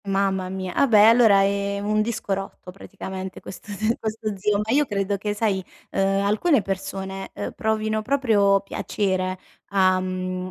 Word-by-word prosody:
Mamma 195 -1 0
mia, 185 -1 -5
ah, 280 - +3
beh, 215 -3 +6
allora, 225 -4 +6
ehm, 200 0 -1
un 215 0 +2
disco 220 -2 -2
rotto 195 -1 -6
praticamente, 190 0 -8
questo 205 - -10
te 215 +3 +1
questo 215 -1 -3
zio, 205 +1 0
ma 220 - -3
io 290 +1 +3
credo 200 -1 -1
che 210 +1 -3
sai, 205 -3 0 0.3
uhm, 195 0 +1
alcune 220 - +2
persone, 195 0 -5
uhm, - - -4
provino 220 0 -1
proprio 215 -6 +3
piacere 185 -2 -2 0.3
a, 185 -2 +3
mhmm, 185 0 -3
200 Hz, 160 wpm, -23 LUFS, 190-215 Hz, 0.3 s, beh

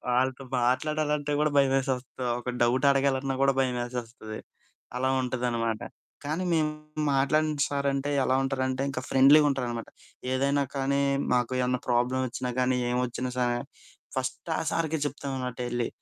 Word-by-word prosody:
వాళ్ళతో 130 +1 +1 0.2
మాట్లాడాలంటే 150 +3 0
కూడా 150 0 +3
భయమేసేస్తా, 135 -2 +1 0.2
ఒక 125 - -5
డౌట్ 125 +4 +3
అడగాలన్నా 135 -1 +1
కూడా 135 0 +4
భయమేసేస్తది. 120 -3 -4 0.6
అలా 130 +1 +1
ఉంటుందనమాట 120 -3 -1 0.4
కానీ, 155 +5 -2
మేము 155 -2 +2 0.4
మాట్లాడిన 150 +2 +2
సారు 140 -1 -1
అంటే, 140 +1 -1
ఎలా 130 - +2
ఉంటారంటే, 130 -1 -1
ఇంకా 130 -2 -3
ఫ్రెండ్లీగ 140 +3 +7
ఉంటారనమాట. 120 -4 -3 0.4
ఏదైనా 140 +2 +2
కానీ, 140 +1 +1 0.3
మాకు 125 0 +1
ఏమన్నా 125 0 +1
ప్రాబ్లమ్ 125 +2 +2
వచ్చినా 125 +1 -4
కానీ, 125 0 +2
ఏం 125 - 0
వచ్చినా 125 +1 -4
సా 125 - +2 0.7
ఫస్ట్ 130 +5 -3
ఆ - - 0
సారుకె 160 -1 0
చెప్తాం 140 0 -4
అనమాట 125 -2 -4
ఎళ్ళి. 120 -1 -1
130 Hz, 140 wpm, -27 LUFS, 125-140 Hz, 0.7 s, ఫ్రెండ్లీగ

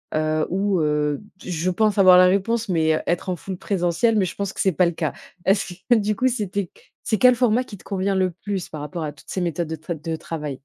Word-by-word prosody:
Heu, 155 0 +1
ou 195 0 +1
heu, 150 0 0 0.2
je 175 0 -2
pense 210 +3 +1
avoir 185 -2 +8
la 180 - +8
réponse, 215 +4 0
mais 160 -3 +2
heu, - - -2
être 175 +2 -1
en 180 - 0
full 190 +3 -6
présentiel, 190 +5 +1
mais 200 - +3
je 185 - -6
pense 200 -1 -3
que - - -3
c'est 190 - +3
pas 180 - +3
le 170 - +1
cas. 155 -2 -2 0.3
Est-ce 195 -1 +1 0.2
que 240 - +7
du 210 -1 +1
coup, 255 - +2
c'était 200 -6 -3 0.3
c'est 220 - 0
quel 250 -1 +6
format 245 0 +2
qui 205 -5 -11
te - - -19
convient 195 0 -1
le 185 -1 +1
plus 190 +1 -5
par 155 -2 -7
rapport 165 +2 -5
à 150 - -3
toutes 145 - -19
ces 185 - -2
méthodes 170 -1 -1
de 160 - -3
t 160 +3 -5
de 160 +1 -4
travail? 150 -4 -5
185 Hz, 255 wpm, -22 LUFS, 160-205 Hz, 0.3 s, avoir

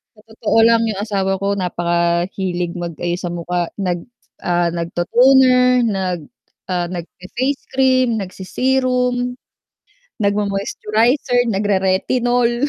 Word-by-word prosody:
Sa 215 - -20
totoo 225 0 0
lang 230 0 +5
yung 210 -3 -3
asawa 195 -3 -1
ko 200 0 0
napakahilig 175 0 -1
mag-ayos 175 0 -3
sa 175 - -4
mukha 175 0 -2
nag, 180 -4 -3 0.4
ah, 175 -1 +2
nag-to-toner, 250 +9 +3
nag, 190 -7 -2 0.4
ah, 175 -1 0
nagfe-face 185 - -4
cream, 260 -1 +3
nagse-serum. 250 +5 -1 0.9
nagmo-moisturizer, 215 +5 +1
nagre-retinol. 235 +6 +1
200 Hz, 95 wpm, -18 LUFS, 175-245 Hz, 0.9 s, lang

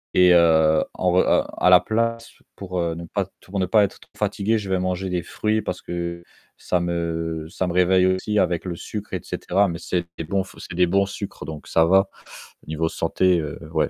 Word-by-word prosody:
et 90 -1 +6
heu, 80 -2 +5
en 90 -1 +1
re 90 - +2
heu, - - +3
à - - +4
la 90 -1 +9
place, 115 +4 -2 0.2
pour, 90 -2 -5
heu, 85 -1 -1
ne 85 +1 -7
pas 100 +3 -2
t 95 - -26
pour 100 +1 -4
ne 95 - +2
pas 105 +3 +5
être 100 - -3
trop - - -20
fatigué, 110 +3 0
je 100 -3 -5
vais 95 - +2
manger 90 +1 -2
des 90 -1 -1
fruits 110 +4 -1
parce 90 -2 -5
que 85 0 -4 0.3
ça 90 - -1
me 85 -2 -2
ça 95 0 -2
me 85 - -2
réveille 90 +1 +4
aussi 95 +3 0
avec 85 -3 +1
le 90 -2 -4
sucre 105 +3 -7
et - - -1
cetera 100 +3 0
mais 85 -2 -4
c'est 85 +1 -2
des - - -4
bons 95 +4 -1
c'est - - -11
des 90 0 +3
bons 100 +3 +2
sucres, 100 0 -7
donc 75 -1 -8
ça 80 - +3
va 95 +3 +4 0.6
au - - -23
niveau 80 +1 -1
santé, 90 +2 +1
heu, 75 -2 -6
ouais, - - +1
90 Hz, 230 wpm, -23 LUFS, 85-95 Hz, 0.6 s, la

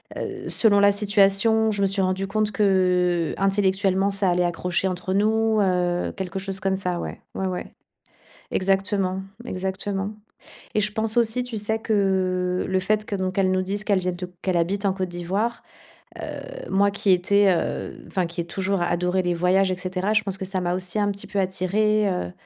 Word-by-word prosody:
heu - - -5
selon 205 -3 +4
la 200 0 +6
situation, 210 +2 +3
je 200 -1 -2
me 195 - +4
suis 195 0 0
rendue 190 +1 -1
compte 215 +1 0
qu'intellectuellement, 190 +1 +2
ça 195 -1 0
allait 175 0 +2
accrocher 180 +2 -1
entre 185 +1 -3
nous. 220 +1 +2
Heu, 180 -2 0
quelque 190 -1 -4
chose 195 0 -5
comme 195 0 0
ça, 180 -2 -2
ouais. - - -6
Ouais, 190 - -2
ouais. 180 -1 -5 0.8
Exactement, 195 0 0 0.2
exactement 195 +1 -3 0.6
et 215 - +3
je 205 0 0
pense 220 +2 -1
aussi, 235 +2 +1
tu 235 -3 -4
sais 220 +2 -1
que 185 -4 0
le 190 0 +1
fait 215 +2 0
que 210 - -5
donc, 185 -1 -2
qu'elle 190 -1 +2
nous 185 0 +2
disent 200 +3 -3
qu'elles 200 -2 +2
viennent 180 -1 -2
de 180 0 -7
qu'elle 185 -2 0
habite 195 +4 0
en 190 - +2
Côte 185 -2 -3
d'Ivoire, 195 +7 -2 0.6
heu, - - -7
moi 200 +1 +3
qui 200 0 0
étais, 195 +2 +4
heu - - -3
enfin, 185 -2 -1
qui 170 +1 -5
ai 170 - -4
toujours 190 +1 -1
adoré 180 +2 +1
les 175 -1 0
voyages 185 +2 +2
et 185 - -1
cetera, 185 +3 -2
je 215 - +4
pense 195 -1 -4
que 190 - -4
ça 190 -1 -2
m'a 175 0 0
aussi 185 +2 -2
un 205 0 +2
petit 200 0 -5
peu 200 0 -4
attiré, 200 +3 +1
heu, 90 - -3
195 Hz, 190 wpm, -24 LUFS, 185-205 Hz, 0.8 s, la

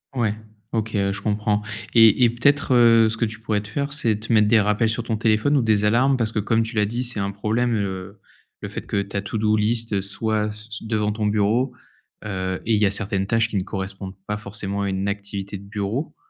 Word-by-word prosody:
Ouais, 115 -4 +1 0.4
OK. 110 -1 -1
Ouais, 100 -1 +1
je 100 - -7
comprends. 105 0 0 0.3
Et 115 +1 +6
et 120 - +6
peut-être, 135 +4 +2
heu, 115 -2 +6
ce 110 - -4
que 115 - +1
tu 110 0 -6
pourrais 110 -2 -1
te 105 - -11
faire, 140 +6 -3
c'est 115 -7 0
te 115 +2 -5
mettre 105 -1 +5
des 115 +1 +5
rappels 105 +2 +1
sur 110 +1 -2
ton 115 -1 -2
téléphone 110 +6 +2
ou - - +3
des 110 -2 +2
alarmes, 130 +5 +3
parce 115 -3 0
que, 110 - -1
comme 115 +2 +1
tu 115 0 -7
l'as 105 -1 +3
dit, 120 +4 -2
c'est 120 -3 -3
un 100 0 -1
problème, 115 +4 0
heu, 100 -1 -4 0.4
le - - -5
fait - - -5
que 100 - 0
ta 100 0 -4
to-do 105 +1 0
list 110 -1 0
soit 105 +2 -1
c 105 +1 -9
c 110 - -6
devant 105 -2 0
ton 105 0 -2
bureau, 110 +5 +1 0.5
heu, 95 -2 -3
et 115 - +1
il 105 - +1
y - - +5
a 100 - +2
certaines 100 -1 -2
tâches 115 +1 +2
qui 105 - -2
ne 95 - 0
correspondent 95 0 -5
pas 105 0 -2
forcément 100 -1 -5
à 100 - -1
une 95 +1 -2
activité 100 0 -4
de 95 - -13
bureau. 105 +7 -3
105 Hz, 240 wpm, -23 LUFS, 100-115 Hz, 0.5 s, Et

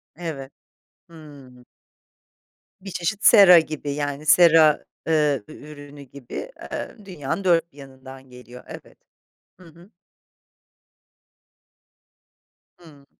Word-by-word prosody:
Evet. 150 -5 -8 0.6
Hımm. 140 -6 -16 1.2
Bir 195 0 -9
çeşit 180 +4 -4
sera 195 -6 +8
gibi 155 -2 -6
yani 145 0 -5
sera, 160 -2 +4 0.2
eee, 150 -6 0
ü 155 - -13
ürünü 145 -1 -13
gibi, 140 - -10 0.2
eee, - - -6
dünyanın 180 0 -6
4 170 -2 +1
bir - - -24
yanından 130 -1 -14
geliyor, 125 0 -14
evet. - - -13 0.6
Hı 185 - -17
hı. 170 +4 -19 2.9
Hımm. 150 -5 -19
150 Hz, 100 wpm, -22 LUFS, 135-170 Hz, 2.9 s, sera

